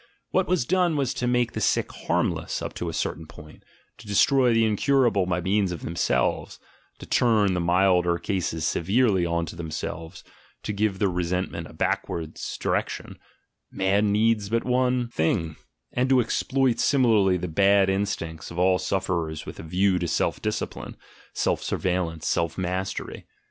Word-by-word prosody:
What 190 Hz, -, +1 dB
was 180 Hz, -8 st, +1 dB
done 180 Hz, 0 st, +2 dB
was 135 Hz, -2 st, 0 dB
to 125 Hz, -, -2 dB
make 120 Hz, -1 st, +1 dB
the -, -, -4 dB
sick -, -, +1 dB
harmless -, -, -1 dB
up -, -, -5 dB
to -, -, -4 dB
a -, -, -3 dB
certain 80 Hz, -1 st, -3 dB
point, 75 Hz, 0 st, -14 dB, 0.4 s
to -, -, -13 dB
destroy 125 Hz, +5 st, +4 dB
the 115 Hz, 0 st, +3 dB
incurable 110 Hz, -3 st, +2 dB
by 90 Hz, 0 st, 0 dB
means 95 Hz, +1 st, +1 dB
of 85 Hz, -, -6 dB
themselves, 85 Hz, +1 st, -1 dB, 0.4 s
to -, -, -10 dB
turn 110 Hz, -5 st, +3 dB
the 90 Hz, -, -1 dB
milder 90 Hz, 0 st, +3 dB
cases 85 Hz, -5 st, -2 dB
severely 95 Hz, +1 st, +2 dB
on 85 Hz, 0 st, -1 dB
to 80 Hz, -, -9 dB
themselves, 80 Hz, 0 st, -6 dB, 0.4 s
to 105 Hz, -, -3 dB
give 100 Hz, -1 st, 0 dB
their 100 Hz, -, +2 dB
resentment 90 Hz, -1 st, -2 dB
a -, -, -14 dB
backward 80 Hz, -2 st, -2 dB, 0.2 s
direction -, -, -2 dB, 0.5 s
("man 100 Hz, +2 st, +1 dB
needs 105 Hz, -1 st, +2 dB
but 115 Hz, +1 st, 0 dB
one 125 Hz, -1 st, +1 dB
thing"), 80 Hz, -4 st, -1 dB, 0.4 s
and 125 Hz, +2 st, +1 dB
to 130 Hz, -1 st, +5 dB
exploit 125 Hz, +1 st, +1 dB
similarly 110 Hz, -9 st, +3 dB
the 90 Hz, -, -4 dB
bad 100 Hz, +3 st, +4 dB
instincts 95 Hz, -5 st, -2 dB
of 85 Hz, -, -9 dB
all 90 Hz, +1 st, +3 dB
sufferers 85 Hz, -4 st, -2 dB
with -, -, -9 dB
a -, -, -5 dB
view 90 Hz, +3 st, +1 dB
to 85 Hz, -, -2 dB
self -, -, -1 dB
discipline, -, -, -4 dB, 0.3 s
self -, -, 0 dB
surveillance, 90 Hz, -3 st, -2 dB
self 85 Hz, -1 st, 0 dB
mastery. 95 Hz, +1 st, -4 dB
95 Hz, 160 wpm, -25 LUFS, 85-115 Hz, 0.5 s, to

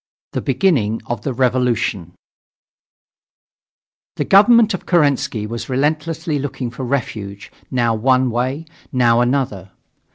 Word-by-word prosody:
THE -, -, -2 dB
BEGINNING 115 Hz, -, +1 dB
OF 120 Hz, -2 st, -4 dB
THE 135 Hz, -, -3 dB
REVOLUTION 120 Hz, -8 st, 0 dB, 2.0 s
The -, -, -2 dB
government 220 Hz, +2 st, +5 dB
of 190 Hz, -, -6 dB
Kerensky 140 Hz, -, +1 dB
was 115 Hz, +2 st, -6 dB
restlessly 155 Hz, +3 st, -1 dB
looking 130 Hz, -3 st, -4 dB
for 130 Hz, -, -7 dB
refuge, 110 Hz, -6 st, -4 dB, 0.2 s
now 120 Hz, -3 st, +1 dB
one 130 Hz, +2 st, +2 dB
way, 130 Hz, +7 st, -2 dB, 0.3 s
now 120 Hz, -2 st, +3 dB
another. 120 Hz, -7 st, -1 dB
125 Hz, 110 wpm, -19 LUFS, 115-145 Hz, 2.0 s, government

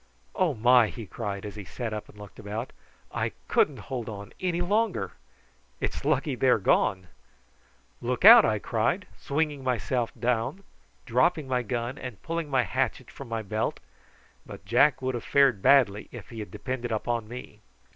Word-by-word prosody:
"Oh 180 Hz, -7 st, +1 dB
my!" 120 Hz, +1 st, +5 dB
he 115 Hz, 0 st, -8 dB
cried, 100 Hz, 0 st, -5 dB
as 105 Hz, -, -7 dB
he 105 Hz, -, -7 dB
sat 115 Hz, +4 st, -5 dB
up 105 Hz, 0 st, -6 dB
and -, -, -16 dB
looked 105 Hz, -1 st, -12 dB
about. 105 Hz, +4 st, -5 dB, 0.4 s
"I -, -, -2 dB
couldn't 145 Hz, -3 st, +2 dB
hold 120 Hz, +1 st, -5 dB
on 100 Hz, +1 st, -8 dB
any 180 Hz, -2 st, -1 dB
longer. 190 Hz, -, 0 dB, 0.7 s
It's -, -, -3 dB
lucky 145 Hz, 0 st, +1 dB
they 130 Hz, +1 st, +2 dB
are -, -, +5 dB
gone." 95 Hz, -2 st, +2 dB, 1.0 s
"Look -, -, -1 dB
out!" -, -, +11 dB
I -, -, +2 dB
cried, -, -, -1 dB
swinging 145 Hz, -1 st, -2 dB
myself 120 Hz, -1 st, -1 dB
down, 125 Hz, -, -1 dB, 0.4 s
dropping 135 Hz, +5 st, +2 dB
my 125 Hz, -1 st, +1 dB
gun, 120 Hz, +3 st, -3 dB
and 125 Hz, -6 st, -7 dB
pulling 165 Hz, -2 st, -3 dB
my 130 Hz, -3 st, +2 dB
hatchet 90 Hz, -, -2 dB
from -, -, -10 dB
my 115 Hz, -1 st, -3 dB
belt; 110 Hz, +2 st, -2 dB, 0.6 s
but -, -, -11 dB
Jack 150 Hz, -3 st, +3 dB
would 130 Hz, 0 st, 0 dB
have 120 Hz, -, -4 dB
fared 135 Hz, -8 st, +3 dB
badly 110 Hz, -7 st, +4 dB
if 120 Hz, -4 st, -10 dB
he 115 Hz, -, -8 dB
had 105 Hz, -, -6 dB
depended 125 Hz, +3 st, -4 dB
on 115 Hz, 0 st, -2 dB
me. 125 Hz, +2 st, -9 dB
120 Hz, 170 wpm, -27 LUFS, 110-135 Hz, 1.0 s, out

